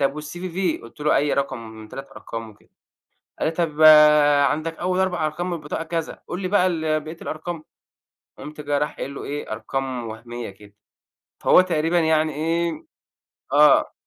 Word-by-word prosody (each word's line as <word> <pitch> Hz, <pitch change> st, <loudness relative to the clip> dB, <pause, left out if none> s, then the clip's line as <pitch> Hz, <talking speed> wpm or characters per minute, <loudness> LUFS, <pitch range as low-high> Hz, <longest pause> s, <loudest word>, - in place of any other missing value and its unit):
طيب 140 Hz, +2 st, 0 dB
والCVV 175 Hz, +3 st, -3 dB
قُلت 115 Hz, +5 st, -14 dB
له 150 Hz, +1 st, +3 dB
أي 145 Hz, 0 st, +1 dB
رقم 140 Hz, -2 st, -1 dB
من 110 Hz, -1 st, -11 dB
3 135 Hz, +3 st, -8 dB
أرقام 115 Hz, -3 st, -7 dB
وكده، 105 Hz, -, -23 dB, 0.7 s
قال -, -, +1 dB
لي: 160 Hz, -, +1 dB
"طيب 160 Hz, -3 st, -1 dB, 0.7 s
عندك 160 Hz, +2 st, -3 dB
أول 180 Hz, +1 st, 0 dB
4 180 Hz, -4 st, 0 dB
أرقام 155 Hz, +4 st, -3 dB
من -, -, -2 dB
البطاقة 155 Hz, +1 st, -5 dB
كذا، 165 Hz, -1 st, -4 dB
قُل 180 Hz, -, -5 dB
لي 185 Hz, -, -1 dB
بقى 185 Hz, -1 st, +3 dB
ال 160 Hz, -3 st, 0 dB
بقية 160 Hz, +2 st, -9 dB
الأرقام." 160 Hz, 0 st, -5 dB, 0.7 s
فقُمت 150 Hz, 0 st, -9 dB
جاي 145 Hz, -1 st, -1 dB
رايح 150 Hz, -, -2 dB
قايل 140 Hz, +1 st, -5 dB
له -, -, -7 dB
إيه 145 Hz, -3 st, -5 dB
أرقام 130 Hz, +1 st, -4 dB
وهميّة 115 Hz, +1 st, -7 dB
كده، 100 Hz, +1 st, -16 dB, 0.7 s
فهو -, -, +6 dB
تقريبًا 170 Hz, -1 st, +1 dB
يعني 160 Hz, -2 st, +2 dB
إيه 165 Hz, +2 st, 0 dB, 0.8 s
آه. -, -, +5 dB
155 Hz, 170 wpm, -23 LUFS, 140-170 Hz, 0.8 s, فهو